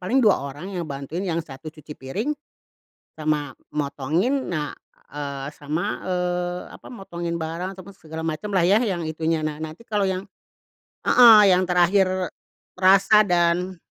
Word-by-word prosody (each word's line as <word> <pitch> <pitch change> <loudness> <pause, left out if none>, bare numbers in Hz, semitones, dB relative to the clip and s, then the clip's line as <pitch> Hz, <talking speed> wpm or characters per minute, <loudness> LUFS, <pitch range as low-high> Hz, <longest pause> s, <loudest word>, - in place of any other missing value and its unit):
Paling 245 +9 +1
dua 220 -5 +5
orang 145 +8 -7
yang 175 - -2
bantuin 140 +6 -5
yang 170 -4 -1
satu 155 -1 -8
cuci 155 -1 -11
piring, 210 - -3 0.8
sama 150 -3 -2 0.2
motongin, 155 - -1
nah, 150 -3 -3 0.3
eee, 140 -1 -5
sama, 150 +4 -3
eee, 180 -1 -2
apa - - -13
motongin 170 -6 -5
barang 175 +4 -5
ataupun 195 +1 -12
segala 160 -1 -6
macem 160 +7 -4
lah 180 -3 +3
ya, 195 - +5
yang 175 -7 -2
itunya. 160 +1 -1
Nah 155 0 -4
nanti 160 +9 -9
kalau 210 -2 0
yang 190 0 -2 0.8
heeh, 215 -6 +8
yang 185 - +2
terakhir 185 +1 +2 0.5
rasa 195 +3 +5
dan 175 0 +1
175 Hz, 145 wpm, -23 LUFS, 155-190 Hz, 0.8 s, heeh